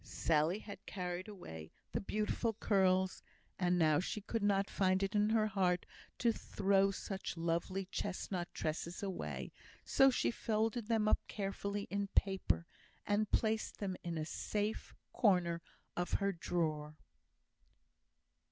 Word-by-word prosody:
Sally 160 Hz, +3 st, +1 dB
had 200 Hz, -2 st, -9 dB
carried 180 Hz, 0 st, -3 dB
away 80 Hz, -, -8 dB, 0.2 s
the -, -, -1 dB
beautiful 215 Hz, +3 st, 0 dB
curls, 190 Hz, -3 st, +2 dB, 0.4 s
and 175 Hz, -3 st, +3 dB
she 210 Hz, -, -2 dB
could 225 Hz, +2 st, -2 dB
not 200 Hz, -1 st, +3 dB
find 190 Hz, 0 st, +2 dB
it 195 Hz, +2 st, -1 dB
in 210 Hz, 0 st, +3 dB
her 220 Hz, -1 st, +3 dB
heart 185 Hz, -4 st, +1 dB, 0.3 s
to 235 Hz, -2 st, +3 dB
throw 195 Hz, -1 st, +2 dB
such 195 Hz, -2 st, -4 dB
lovely 170 Hz, +3 st, -1 dB
chestnut 185 Hz, -2 st, -3 dB
tresses 165 Hz, +4 st, -3 dB
away, 190 Hz, -2 st, -4 dB, 0.3 s
so 270 Hz, -, +6 dB
she 250 Hz, -, +1 dB
folded 225 Hz, 0 st, 0 dB
them 220 Hz, -2 st, +2 dB
up -, -, +4 dB
carefully 200 Hz, 0 st, -3 dB
in 200 Hz, 0 st, 0 dB
paper, 100 Hz, -, +2 dB, 0.4 s
and 205 Hz, 0 st, +1 dB
placed 220 Hz, -1 st, +1 dB
them 195 Hz, -3 st, -2 dB
in 170 Hz, -1 st, -3 dB
a 155 Hz, -, -1 dB
safe 210 Hz, +5 st, -2 dB, 0.2 s
corner 180 Hz, -6 st, +3 dB, 0.3 s
of 175 Hz, 0 st, -2 dB
her 200 Hz, 0 st, +2 dB
drawer. 155 Hz, -4 st, -2 dB
195 Hz, 135 wpm, -36 LUFS, 175-210 Hz, 0.4 s, so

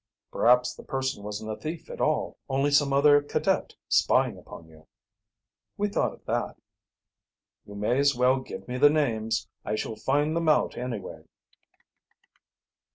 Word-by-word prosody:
"Perhaps 125 Hz, +1 st, +3 dB
the -, -, -12 dB
person 135 Hz, -5 st, -3 dB
wasn't 105 Hz, +1 st, -5 dB
a -, -, -3 dB
thief 160 Hz, +7 st, -7 dB
at -, -, -7 dB
all, -, -, 0 dB
only 135 Hz, +2 st, +1 dB
some 145 Hz, -1 st, +3 dB
other 145 Hz, +1 st, +5 dB
cadet 145 Hz, -, -1 dB
spying -, -, +2 dB
upon 80 Hz, -, -12 dB
you." 80 Hz, -1 st, -19 dB, 0.9 s
"We 205 Hz, 0 st, 0 dB
thought -, -, 0 dB
of -, -, -19 dB
that." -, -, -2 dB, 1.1 s
"You 100 Hz, -, -10 dB
may 105 Hz, +6 st, 0 dB
as 140 Hz, -1 st, +3 dB
well 125 Hz, +2 st, +3 dB
give 130 Hz, -, -9 dB
me 125 Hz, 0 st, -4 dB
the 145 Hz, +2 st, +7 dB
names. 115 Hz, -8 st, 0 dB, 0.2 s
I 105 Hz, -, -2 dB
shall 110 Hz, -, -4 dB
find 145 Hz, +7 st, 0 dB
them 165 Hz, -1 st, +1 dB
out 155 Hz, -, +2 dB
anyway." 120 Hz, -5 st, -6 dB
130 Hz, 155 wpm, -27 LUFS, 110-145 Hz, 1.1 s, the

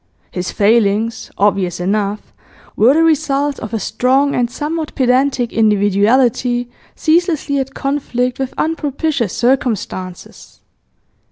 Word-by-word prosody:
His 180 Hz, -1 st, -4 dB
failings, 220 Hz, +1 st, +1 dB
obvious 195 Hz, -4 st, +1 dB
enough, 205 Hz, +2 st, -2 dB, 0.4 s
were 245 Hz, +6 st, +4 dB
the 325 Hz, -, +4 dB
results 290 Hz, -3 st, +1 dB
of 215 Hz, -, -7 dB
a 225 Hz, -, -2 dB
strong 270 Hz, +6 st, +1 dB
and 240 Hz, -1 st, 0 dB
somewhat 310 Hz, +4 st, -4 dB
pedantic 255 Hz, -1 st, +1 dB
individuality 225 Hz, +4 st, +2 dB, 0.2 s
ceaselessly 315 Hz, -3 st, +1 dB
at 270 Hz, 0 st, -4 dB
conflict 260 Hz, -3 st, -2 dB
with 265 Hz, -1 st, -4 dB
unpropitious 295 Hz, -, -1 dB
circumstances. 225 Hz, -7 st, -3 dB
250 Hz, 105 wpm, -16 LUFS, 210-280 Hz, 0.4 s, were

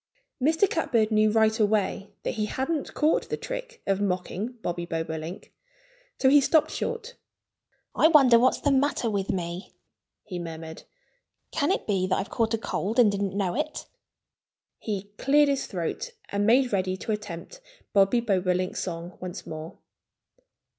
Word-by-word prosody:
Mr. 320 Hz, +8 st, +3 dB
Catbird 230 Hz, -, +1 dB
knew 215 Hz, 0 st, +4 dB
right 220 Hz, +1 st, +3 dB
away 205 Hz, -1 st, +1 dB
that -, -, -2 dB
he 215 Hz, -2 st, -1 dB
hadn't 275 Hz, +6 st, -2 dB
caught 310 Hz, +1 st, +2 dB
the -, -, -2 dB
trick -, -, -7 dB
of 195 Hz, 0 st, 0 dB
mocking 195 Hz, +4 st, -2 dB
Bobby 175 Hz, 0 st, -2 dB
Bobolink. 165 Hz, +1 st, -5 dB, 0.6 s
So 265 Hz, -, +2 dB
he 285 Hz, +2 st, +7 dB
stopped 310 Hz, +3 st, +3 dB
short. 475 Hz, 0 st, -4 dB, 0.8 s
"I -, -, +5 dB
wonder 270 Hz, -7 st, +7 dB
what's 255 Hz, +2 st, +3 dB
the 285 Hz, -, +1 dB
matter 270 Hz, -4 st, +1 dB
with 200 Hz, -2 st, -2 dB
me," 175 Hz, 0 st, -4 dB, 0.5 s
he 180 Hz, -, -6 dB
murmured. 160 Hz, -1 st, -8 dB, 0.7 s
"Can 285 Hz, 0 st, 0 dB
it -, -, -1 dB
be 190 Hz, -3 st, 0 dB
that 185 Hz, -, +1 dB
I've 195 Hz, +4 st, -4 dB
caught 225 Hz, -1 st, +1 dB
a -, -, -3 dB
cold 220 Hz, 0 st, -3 dB
and 230 Hz, -4 st, +6 dB
didn't 200 Hz, -1 st, -2 dB
know 190 Hz, -4 st, 0 dB
it?" 305 Hz, -, -3 dB, 0.9 s
He 205 Hz, -2 st, -4 dB
cleared 290 Hz, +1 st, +4 dB
his 275 Hz, -1 st, 0 dB
throat 185 Hz, -, -4 dB, 0.2 s
and 205 Hz, +1 st, 0 dB
made 245 Hz, +1 st, +4 dB
ready 185 Hz, -1 st, 0 dB
to 220 Hz, -, -4 dB
attempt 210 Hz, -, -6 dB, 0.3 s
Bobby 200 Hz, +4 st, +4 dB
Bobolink's 185 Hz, -4 st, 0 dB
song 170 Hz, -1 st, -6 dB
once 180 Hz, -1 st, -6 dB
more. 155 Hz, +1 st, -7 dB
210 Hz, 155 wpm, -26 LUFS, 185-265 Hz, 0.9 s, he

